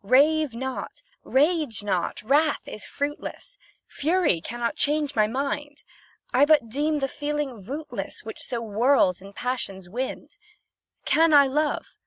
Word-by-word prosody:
Rave 285 Hz, +4 st, +4 dB
not, 265 Hz, -, -5 dB, 0.2 s
rage 290 Hz, -, +1 dB
not, 185 Hz, -1 st, -1 dB
wrath 290 Hz, +6 st, +2 dB
is 215 Hz, -, -7 dB
fruitless, 295 Hz, +11 st, -5 dB, 0.3 s
Fury 310 Hz, -, +1 dB
cannot 235 Hz, +4 st, -3 dB
change 295 Hz, -1 st, 0 dB
my 215 Hz, -1 st, +4 dB
mind; 285 Hz, +4 st, -3 dB, 0.5 s
I 255 Hz, +3 st, +5 dB
but 290 Hz, -6 st, +4 dB
deem 295 Hz, +5 st, 0 dB
the 270 Hz, -, +1 dB
feeling 290 Hz, -6 st, -3 dB
rootless 285 Hz, +9 st, -5 dB
Which -, -, -8 dB
so 235 Hz, -2 st, -3 dB
whirls 215 Hz, -4 st, +3 dB
in 195 Hz, +1 st, -11 dB
passion's 200 Hz, -6 st, -4 dB
wind. 255 Hz, +4 st, -5 dB, 0.7 s
Can 320 Hz, -1 st, +4 dB
I 285 Hz, -1 st, +8 dB
love? 295 Hz, +3 st, 0 dB
275 Hz, 135 wpm, -25 LUFS, 230-295 Hz, 0.7 s, I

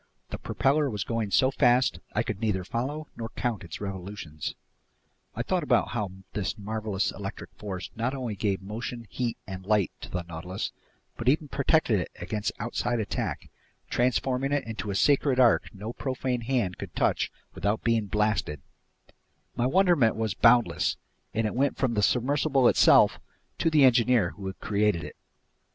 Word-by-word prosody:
The -, -, -4 dB
propeller 145 Hz, +1 st, +1 dB
was 105 Hz, -5 st, -2 dB
going 115 Hz, -3 st, -2 dB
so 130 Hz, +6 st, +4 dB
fast 125 Hz, -1 st, +3 dB, 0.2 s
I 110 Hz, -, +2 dB
could 105 Hz, -4 st, -4 dB
neither 105 Hz, -5 st, 0 dB
follow 140 Hz, +10 st, -3 dB
nor 115 Hz, -1 st, -5 dB
count 120 Hz, -6 st, -2 dB
its 85 Hz, -2 st, -8 dB
revolutions. 95 Hz, -5 st, -6 dB, 0.8 s
I -, -, -2 dB
thought -, -, 0 dB
about -, -, +2 dB
how 110 Hz, -3 st, -2 dB, 0.2 s
this 105 Hz, +2 st, -2 dB
marvelous 105 Hz, -1 st, -2 dB
electric 95 Hz, -1 st, -7 dB
force 95 Hz, -1 st, -6 dB
not 120 Hz, +4 st, -1 dB
only 125 Hz, -5 st, -3 dB
gave 100 Hz, -1 st, -1 dB
motion, 115 Hz, +4 st, -5 dB
heat, 120 Hz, -2 st, -2 dB
and 95 Hz, -1 st, -7 dB
light 105 Hz, -1 st, +2 dB
to -, -, -8 dB
the 90 Hz, -2 st, -3 dB
Nautilus 85 Hz, +3 st, -5 dB, 0.5 s
but 120 Hz, -, +1 dB
even 150 Hz, +1 st, +1 dB
protected 140 Hz, -, +2 dB
it 90 Hz, -, -3 dB
against 105 Hz, +4 st, -2 dB
outside 120 Hz, +1 st, -1 dB
attack, 105 Hz, -, -3 dB, 0.4 s
transforming 125 Hz, +2 st, +1 dB
it 145 Hz, -1 st, +1 dB
into 110 Hz, -2 st, -5 dB
a 100 Hz, -, -2 dB
sacred 140 Hz, +2 st, +3 dB
ark 120 Hz, -3 st, +4 dB
no 105 Hz, +4 st, -7 dB
profane 130 Hz, -2 st, -2 dB
hand 115 Hz, -7 st, -1 dB
could -, -, -8 dB
touch -, -, +1 dB, 0.2 s
without 105 Hz, +2 st, -1 dB
being 115 Hz, -3 st, +1 dB
blasted; 105 Hz, -8 st, 0 dB, 1.0 s
my 120 Hz, +1 st, +1 dB
wonderment 170 Hz, -, +4 dB
was 110 Hz, -3 st, -1 dB
boundless, 120 Hz, +1 st, +3 dB, 0.3 s
and 110 Hz, 0 st, 0 dB
it 105 Hz, -, -1 dB
went 135 Hz, +3 st, +1 dB
from 130 Hz, -3 st, +1 dB
the 105 Hz, -, +1 dB
submersible 135 Hz, +3 st, +3 dB
itself -, -, +6 dB, 0.4 s
to 165 Hz, -, +3 dB
the 155 Hz, -3 st, +5 dB
engineer 120 Hz, -6 st, +4 dB
who 100 Hz, -1 st, -8 dB
had 95 Hz, -, -6 dB
created 105 Hz, -4 st, +1 dB
it. -, -, -8 dB
115 Hz, 165 wpm, -27 LUFS, 100-125 Hz, 1.0 s, itself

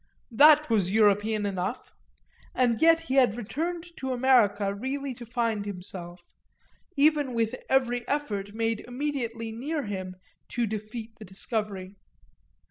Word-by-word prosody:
That 300 Hz, +5 st, +7 dB
was 205 Hz, -6 st, +2 dB
European 210 Hz, 0 st, +3 dB
enough, 195 Hz, +4 st, -3 dB, 0.6 s
and 240 Hz, -3 st, +2 dB
yet 330 Hz, 0 st, +6 dB
he 330 Hz, -5 st, -4 dB
had 250 Hz, -5 st, +4 dB
returned 325 Hz, -, -3 dB
to 265 Hz, -1 st, -3 dB
America 220 Hz, -6 st, +3 dB
really 265 Hz, +5 st, -4 dB
to 240 Hz, -1 st, -11 dB
find 230 Hz, -3 st, -1 dB
himself, 180 Hz, -3 st, -7 dB, 0.7 s
even 290 Hz, -3 st, +3 dB
with 225 Hz, 0 st, 0 dB, 0.2 s
every 245 Hz, -2 st, +1 dB
effort 210 Hz, -9 st, -2 dB
made 225 Hz, -1 st, 0 dB
immediately 245 Hz, -4 st, -3 dB
near 285 Hz, +7 st, -3 dB
him 185 Hz, -3 st, -5 dB, 0.3 s
to 240 Hz, -1 st, -1 dB
defeat 220 Hz, +2 st, -6 dB
the 215 Hz, -, -9 dB
discovery. 195 Hz, -1 st, -4 dB
230 Hz, 125 wpm, -27 LUFS, 205-265 Hz, 0.7 s, That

